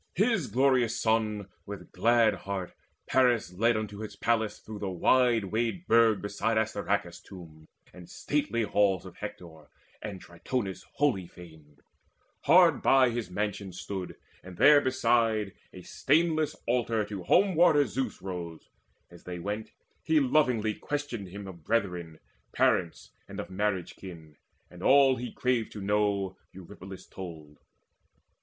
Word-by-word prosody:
His 205 Hz, -, +1 dB
glorious 125 Hz, -1 st, +2 dB
son 110 Hz, -3 st, 0 dB, 0.2 s
with 100 Hz, -1 st, -9 dB
glad 115 Hz, +4 st, +3 dB
heart 95 Hz, -2 st, -5 dB, 0.3 s
Paris 125 Hz, -8 st, +2 dB
led 115 Hz, +4 st, +2 dB
Unto 105 Hz, -1 st, -5 dB
his 110 Hz, -1 st, -7 dB
palace 110 Hz, -3 st, 0 dB
through 110 Hz, -1 st, -9 dB
the 100 Hz, -2 st, -3 dB
wide 115 Hz, +5 st, +3 dB
wayed 115 Hz, -, -2 dB
burg 115 Hz, -3 st, +4 dB
Beside 105 Hz, +2 st, -1 dB
Assaracus' 100 Hz, -4 st, -1 dB
tomb 80 Hz, -5 st, -13 dB, 0.3 s
and 90 Hz, -1 st, -13 dB
stately 140 Hz, -6 st, -1 dB
halls 100 Hz, -3 st, +1 dB
Of 90 Hz, -1 st, -12 dB
Hector, 85 Hz, -7 st, -9 dB, 0.3 s
and 100 Hz, -3 st, -6 dB
Tritonis' 95 Hz, +4 st, -5 dB
holy 120 Hz, -12 st, 0 dB
fane. 80 Hz, -5 st, -15 dB, 0.7 s
Hard -, -, +6 dB
by 130 Hz, -2 st, +4 dB
his 115 Hz, -4 st, -4 dB
mansion 100 Hz, 0 st, -3 dB
stood, 95 Hz, 0 st, -6 dB, 0.3 s
and 90 Hz, -1 st, -12 dB
therebeside 120 Hz, -7 st, +3 dB, 0.2 s
The 90 Hz, -, -11 dB
stainless 155 Hz, -, +1 dB
altar 115 Hz, -2 st, 0 dB
of 105 Hz, -, -6 dB
Home 175 Hz, -, +2 dB
warder 155 Hz, -3 st, +5 dB
Zeus 125 Hz, -3 st, -4 dB
Rose. 85 Hz, -4 st, -7 dB, 0.4 s
As 85 Hz, -, -16 dB
they 90 Hz, -1 st, -6 dB
went, 105 Hz, +5 st, -5 dB, 0.3 s
he 160 Hz, -1 st, +3 dB
lovingly 125 Hz, -6 st, +2 dB
questioned 145 Hz, -7 st, -4 dB
him 100 Hz, +3 st, -9 dB
Of 85 Hz, -4 st, -11 dB
brethren, 90 Hz, -6 st, -2 dB, 0.4 s
parents, 85 Hz, -3 st, 0 dB, 0.2 s
and -, -, -8 dB
of -, -, -6 dB
marriage 95 Hz, -2 st, -2 dB
kin; 80 Hz, -5 st, -11 dB, 0.3 s
And 90 Hz, -, -14 dB
all 135 Hz, +2 st, +5 dB
he 125 Hz, +1 st, -5 dB
craved 125 Hz, -3 st, -1 dB
to 105 Hz, -, -7 dB
know 100 Hz, -2 st, 0 dB, 0.2 s
Eurypylus 95 Hz, +1 st, -11 dB
told. 80 Hz, -6 st, -10 dB
105 Hz, 135 wpm, -28 LUFS, 95-120 Hz, 0.7 s, Hard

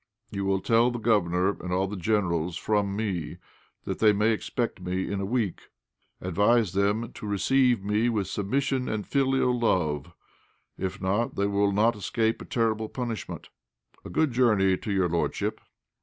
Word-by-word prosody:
You 100 Hz, -2 st, -3 dB
will 95 Hz, 0 st, +1 dB
tell 115 Hz, +3 st, +3 dB
the 120 Hz, -, -4 dB
governor 100 Hz, -4 st, +1 dB
and 90 Hz, -, -5 dB
all 95 Hz, +1 st, +1 dB
the 100 Hz, +2 st, -5 dB
generals 90 Hz, -4 st, 0 dB
from 100 Hz, -2 st, 0 dB
me 100 Hz, -7 st, -3 dB, 0.5 s
that -, -, -4 dB
they 110 Hz, -1 st, +5 dB
may 105 Hz, +2 st, +2 dB
expect 115 Hz, -2 st, -2 dB
me 90 Hz, +1 st, -2 dB
in 100 Hz, -1 st, -2 dB
a -, -, -2 dB
week. 110 Hz, -5 st, -2 dB, 0.5 s
Advise 100 Hz, +3 st, +2 dB
them 105 Hz, +4 st, 0 dB
to 105 Hz, -, -7 dB
receive 120 Hz, +3 st, +2 dB
me 105 Hz, +4 st, +1 dB
with 105 Hz, -4 st, 0 dB
submission 125 Hz, +7 st, -1 dB
and 105 Hz, -1 st, -2 dB
filial 135 Hz, -3 st, +1 dB
love; 80 Hz, -, 0 dB, 0.6 s
if 95 Hz, -, -4 dB
not, 100 Hz, +5 st, 0 dB
they 100 Hz, -, +1 dB
will 100 Hz, 0 st, +2 dB
not 110 Hz, +4 st, +3 dB
escape 110 Hz, +2 st, -1 dB
a -, -, -7 dB
terrible 110 Hz, -2 st, 0 dB
punishment. 120 Hz, -7 st, -5 dB, 0.5 s
A -, -, -8 dB
good 145 Hz, -, +1 dB
journey, 105 Hz, -6 st, +3 dB
to 105 Hz, -, -5 dB
your 95 Hz, -2 st, +2 dB
lordship." 85 Hz, 0 st, -1 dB
105 Hz, 165 wpm, -27 LUFS, 95-115 Hz, 0.6 s, they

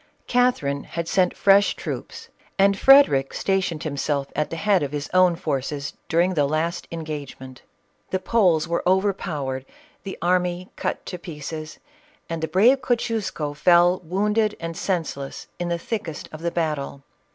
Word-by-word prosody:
Catherine 245 Hz, -, +1 dB
had 170 Hz, -1 st, -4 dB
sent 180 Hz, 0 st, +1 dB
fresh 200 Hz, 0 st, +4 dB
troops, -, -, -7 dB, 0.3 s
and 200 Hz, 0 st, +4 dB
Frederic 265 Hz, -, +5 dB
sta 195 Hz, -1 st, +1 dB
tioned 170 Hz, -3 st, -4 dB
himself 140 Hz, -1 st, -2 dB
at 150 Hz, -, 0 dB
the -, -, -4 dB
head 200 Hz, +1 st, +2 dB
of 145 Hz, 0 st, -3 dB
his 145 Hz, 0 st, -3 dB
own 185 Hz, -1 st, +5 dB
forces 140 Hz, -1 st, -3 dB, 0.2 s
daring 175 Hz, +3 st, +2 dB
the 145 Hz, -4 st, +2 dB
last 165 Hz, +4 st, -2 dB
engagement. 145 Hz, -5 st, -7 dB, 0.5 s
The 190 Hz, -, 0 dB
Poles 185 Hz, -5 st, +2 dB
were 170 Hz, 0 st, 0 dB
overpowered, 170 Hz, -9 st, -1 dB, 0.4 s
the 195 Hz, -, -7 dB
army 180 Hz, +1 st, 0 dB
cut -, -, -3 dB
to 180 Hz, -, -6 dB
pieces, 155 Hz, -2 st, -7 dB, 0.5 s
and 165 Hz, -1 st, -3 dB
the 160 Hz, -, -1 dB
brave 230 Hz, -, +4 dB
Kosciusko 225 Hz, -, -1 dB
fell 175 Hz, +3 st, +4 dB
wounded 210 Hz, +5 st, 0 dB
and 165 Hz, 0 st, -5 dB
senseless 160 Hz, -7 st, -3 dB
in 175 Hz, 0 st, -2 dB
the 170 Hz, -, 0 dB
thickest 170 Hz, -4 st, -5 dB
of 155 Hz, -, -9 dB
the 170 Hz, -, 0 dB
battle. 150 Hz, -5 st, -3 dB
170 Hz, 150 wpm, -23 LUFS, 150-190 Hz, 0.5 s, Frederic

